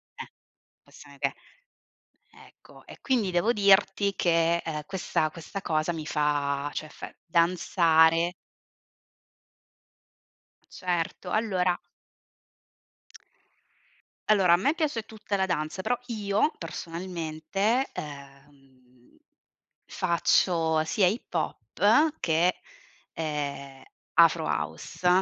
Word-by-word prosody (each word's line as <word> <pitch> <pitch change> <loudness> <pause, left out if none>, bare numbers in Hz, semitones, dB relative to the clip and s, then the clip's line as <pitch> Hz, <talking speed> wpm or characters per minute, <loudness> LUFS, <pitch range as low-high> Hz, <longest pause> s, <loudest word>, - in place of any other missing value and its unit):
Eh, - - -9 0.5
possiamo - - -16
che - - 0 1.0
ecco. - - -18
E - - -13
quindi 240 -7 +1
devo 180 +6 +2
dirti 200 -1 +3
che, 170 -1 +2
ehm, 150 -2 -4
questa 165 -3 -1
questa 170 +5 -8
cosa 155 -1 0
mi 160 -2 -6
fa, 145 -2 0
cioè 155 - -4
fa - - -9
danzare 170 0 +3 2.3
Certo, 175 -2 -3
allora 185 -5 0 2.5
allora, 195 -5 +5
a - - +6
me 275 - +1
piace 295 -9 -1
tutta 215 -2 -4
la 190 - +1
danza 170 0 -2
però, 245 +6 0
io, 215 +3 0
personalmente, 170 - -2
ehm, 135 -3 -12 0.7
faccio 165 -2 +1
sia 185 +5 +1
hip 210 +7 -3
hop 205 - +1
che, 170 +2 +2 0.6
ehm, 140 -3 -4 0.3
afro - - +5
house 80 - -3
170 Hz, 95 wpm, -27 LUFS, 155-195 Hz, 2.5 s, a